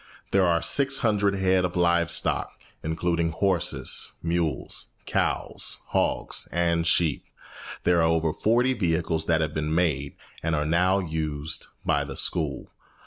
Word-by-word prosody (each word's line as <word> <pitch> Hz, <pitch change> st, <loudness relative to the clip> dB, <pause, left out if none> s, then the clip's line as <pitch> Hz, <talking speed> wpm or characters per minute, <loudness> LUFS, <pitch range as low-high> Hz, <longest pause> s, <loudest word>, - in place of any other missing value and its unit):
There 95 Hz, -2 st, +3 dB
are 85 Hz, -1 st, +1 dB
six 135 Hz, -1 st, +3 dB
hundred 100 Hz, -3 st, +2 dB
head 95 Hz, -1 st, +2 dB
of 90 Hz, -1 st, -2 dB
live 85 Hz, -1 st, +2 dB
stock, -, -, -1 dB, 0.2 s
including 85 Hz, +1 st, -1 dB
horses, 90 Hz, +1 st, +1 dB
mules, 85 Hz, -4 st, -1 dB, 0.2 s
cows, -, -, -1 dB
hogs, -, -, 0 dB
and 85 Hz, 0 st, +1 dB
sheep. 80 Hz, -3 st, +2 dB, 0.6 s
There 90 Hz, -1 st, +3 dB
are 80 Hz, 0 st, +3 dB
over 80 Hz, -1 st, +1 dB
forty 120 Hz, +7 st, +2 dB
vehicles 80 Hz, -6 st, -1 dB
that 80 Hz, -1 st, +2 dB
have 75 Hz, -1 st, -2 dB
been 75 Hz, 0 st, -2 dB
made, 75 Hz, -5 st, 0 dB, 0.3 s
and 80 Hz, 0 st, 0 dB
are 75 Hz, 0 st, -1 dB
now 90 Hz, +4 st, +2 dB
used, 80 Hz, -3 st, -3 dB, 0.2 s
by 70 Hz, 0 st, +1 dB
the 70 Hz, -1 st, -7 dB
school. -, -, -2 dB
85 Hz, 140 wpm, -25 LUFS, 80-90 Hz, 0.6 s, There